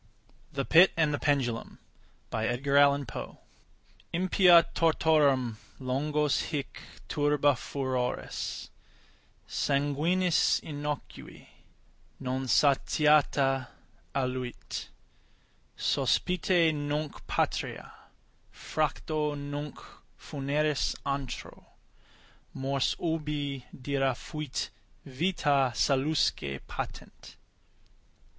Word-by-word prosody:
THE 135 -1 -2
PIT 175 +4 +7
AND 155 -2 +2
THE 145 - -1
PENDULUM 130 -5 -1 0.6
Impia 140 +4 +1 1.4
tortorum 145 -7 +3 0.2
longos 145 +2 0
hic 145 -4 -4 0.3
turba 145 -1 +3
furores 130 -1 -3 0.8
Sanguinis 150 +6 +2
innocui, 145 -1 -6 0.7
non 130 0 -3
satiata, 140 -1 +3 0.5
aluit. 130 -2 -3 0.9
Sospite 175 -2 +2
nunc 145 0 -3
patria, - - -2 0.6
fracto 155 -1 -2
nunc 145 +1 -5 0.4
funeris 145 +1 -1
antro, 140 -2 -5 0.8
Mors 135 0 0
ubi 150 -5 -2
dira 135 -1 0
fuit 150 -1 -5 0.3
vita 140 -3 +1
salusque 135 - +1
patent. - - -8
145 Hz, 65 wpm, -29 LUFS, 135-150 Hz, 1.4 s, PIT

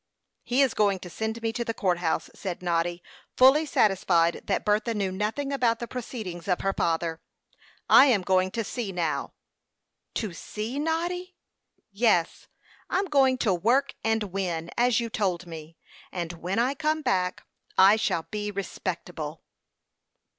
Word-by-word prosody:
"He 255 +3 +2
is 265 - +1
going 200 -2 +2
to 180 - -9
send 220 +4 -4
me 225 0 0
to 235 - -2
the 230 -1 -3
court 180 -3 +1
house," 165 -2 -1
said 180 -2 -6
Noddy, 175 0 -1 0.3
fully 275 +5 +6
satisfied 180 -8 +2
that - - -1
Bertha 215 +2 +1
knew 195 -2 -1
nothing 220 +9 -2
about 240 -4 +2
the 235 - -5
proceedings 220 -9 -6
of 180 -2 +1
her 195 0 0
father. 165 -1 -1 0.7
"I 275 - +8
am 215 -8 +3
going 185 0 +2
to 230 0 -1
sea, 220 -1 -4
now." 170 -4 -2 0.8
"To 210 -6 -2
sea, 215 +9 -5
Noddy?" 350 +4 -2 0.6
"Yes, 200 -5 +1 0.4
I'm 390 - +1
going 270 -6 +3
to 200 - +3
work 235 +10 +2
and 225 -1 +1
win, 170 -4 -2
as 245 -1 +3
you 235 - -2
told 185 -5 -1
me, 165 -1 -10 0.3
and 175 -2 -4
when 180 +4 -4
I 250 +4 +2
come 310 +1 -1
back 180 -4 0 0.3
I 195 +2 +8
shall 170 -6 0
be 210 -1 -3
respectable." 175 -5 -5
205 Hz, 155 wpm, -27 LUFS, 175-240 Hz, 0.8 s, I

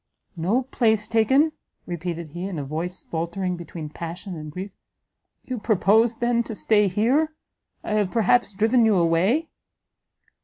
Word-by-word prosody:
"No 195 +10 +1
place 220 -4 +1
taken!" 265 +8 +3 0.3
repeated 170 -1 -5
he, 175 +4 -6
in 190 -4 -5
a 145 - -3
voice 165 +6 -4
faultering 170 +3 -3
between 170 -2 -7
passion 170 +4 -7
and 155 -1 -7
grief; 190 +5 -6 0.7
"you 255 -2 -4
purposed, 220 +2 +3
then, 240 0 +2
to 225 - -6
stay 210 -1 +3
here? 260 - +1 0.5
I - - -5
have 210 -3 +1
perhaps 230 +2 +2
driven 225 +5 +3
you 220 -2 +4
away?" 185 - +2
200 Hz, 145 wpm, -24 LUFS, 170-230 Hz, 0.7 s, you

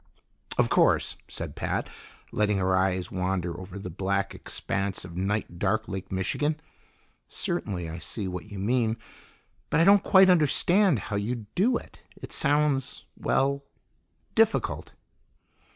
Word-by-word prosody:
"Of - - +3
course," - - +3
said - - -5
Pat, - - -2 0.4
letting 105 -1 +1
her 95 0 +2
eyes 95 -1 0
wander 90 -2 -1
over 95 +1 -8
the 95 -2 -6
black 100 +2 -1
expanse 100 -1 -3
of 85 -2 -10
night 95 -1 -2
dark 110 +3 0
Lake 95 -1 -6
Michigan. 145 +12 -1 0.7
"Certainly 100 - -3
I 80 +1 -6
see 100 +2 -4
what 90 +2 -6
you 100 - -6
mean 115 +2 +1 0.7
but - - +2
I - - +6
don't 200 +2 +7
quite 190 -1 +6
understand 175 - +4
how 100 0 -3
you'd 110 +1 -4
do 235 +6 +3
it. - - -13 0.2
It - - -10
sounds 145 -2 +1
well, 140 +1 +1 0.7
difficult." - - +1
105 Hz, 135 wpm, -27 LUFS, 95-140 Hz, 0.7 s, don't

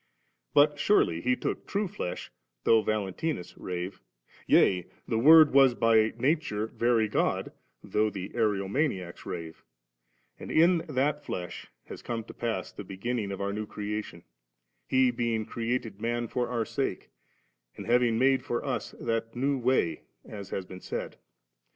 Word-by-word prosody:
But 145 0 +5
surely 85 - +3
He 125 +5 +2
took - - -4
true 205 0 -1
flesh, 90 - -5 0.3
though 110 -1 +5
VaJentinus 105 - -2
rave; 90 +1 -5 0.5
yea 90 -2 +4 0.2
the 110 - 0
Word 155 +3 +8
was 135 -3 +6
by 110 -2 +4
nature 130 -5 0
Very 115 0 +1
God, 105 - 0 0.3
though 110 0 +1
Ariomaniacs 100 - -2
rave*; 85 -2 -6 0.8
and - - -8
in 170 +2 +4
that 145 +2 0
flesh 90 - -6 0.2
has - - -9
come 115 -1 -4
to - - -11
pass 115 -1 -3
the - - -8
beginnings 100 +2 -3
of 100 - -5
our 100 0 -1
new 105 0 -4
creation, 105 -4 -5 0.6
He 130 -1 +3
being 115 -2 -1
created 115 -3 -3
man 120 0 -1
for 120 +1 -2
our 120 -2 -1
sake, - - -3 0.7
and - - -7
having 120 -1 +3
made 130 +1 +3
for 120 - -3
us - - -3
that 115 0 -2
new 135 +2 0
way, 125 -8 +1 0.2
as 100 -3 -8
has 95 - -4
been 90 0 -10
said. - - -5
115 Hz, 145 wpm, -28 LUFS, 100-130 Hz, 0.8 s, Word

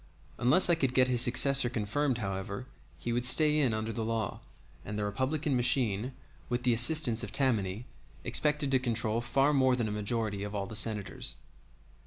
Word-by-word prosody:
Unless 140 +10 +5
I 175 - +3
could 135 -6 -1
get 130 0 +3
his 120 -2 +3
successor 125 +1 +5
confirmed, 120 +4 -2
however, 100 +2 -5 0.3
he 120 - -5
would 120 +1 -1
stay 150 +4 +5
in 135 -5 +1
under 110 +1 -4
the 115 - -4
law, 110 -3 -3 0.4
and 105 +1 -7
the 105 - -3
Republican 130 +8 -2
machine, 125 -2 0 0.4
with 120 0 -3
the 125 -1 +2
assistance 120 0 +3
of - - -6
Tammany, 110 -5 -1 0.4
expected 150 -2 0
to 130 - +3
control 115 -2 -1
far 135 +4 0
more 130 -2 +2
than 120 -3 -2
a - - -5
majority 105 -1 -3
of 105 +1 -6
all 100 -1 -3
the 110 - -9
Senators. 105 -2 -1
120 Hz, 180 wpm, -29 LUFS, 110-135 Hz, 0.4 s, Unless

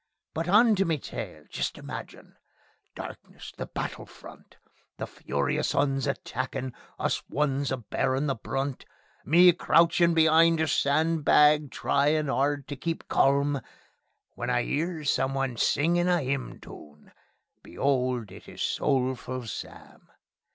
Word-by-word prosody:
But 165 +2 -3
on 220 +4 +6
to 195 - +3
me 165 -4 0
tale. - - -7
Just - - -3
imagine... - - -9 0.6
Darkness! - - -9
The - - -6
battle - - -5
front! - - -15 0.4
The - - -4
furious 70 -1 -2
'Uns 135 -1 +1
attackin'! 130 -1 -4 0.2
Us - - -1
ones 140 -1 0
a 130 - 0
bearin' 130 +3 -1
the 140 - +1
brunt! 135 +3 -4 0.4
Me 175 +4 +7
crouchin' 170 0 +3
be'ind 165 +1 +5
a 160 - +1
sandbag, 150 0 +3
tryin' 145 +2 +1
'ard 140 0 0
to 145 - -4
keep 165 +5 -4
calm, 140 0 +2 0.7
When 120 - -4
I 125 -1 +1
'ears 155 0 -1
someone 135 -1 -1
singin' 175 +9 +2
a 180 -1 +3
'ymn 135 -2 -3
toon; 75 0 -14 0.5
be'old! 125 -6 -1
it - - -12
is - - -5
Soulful 130 -2 -1
Sam. 110 - -9
140 Hz, 130 wpm, -27 LUFS, 130-160 Hz, 0.7 s, Me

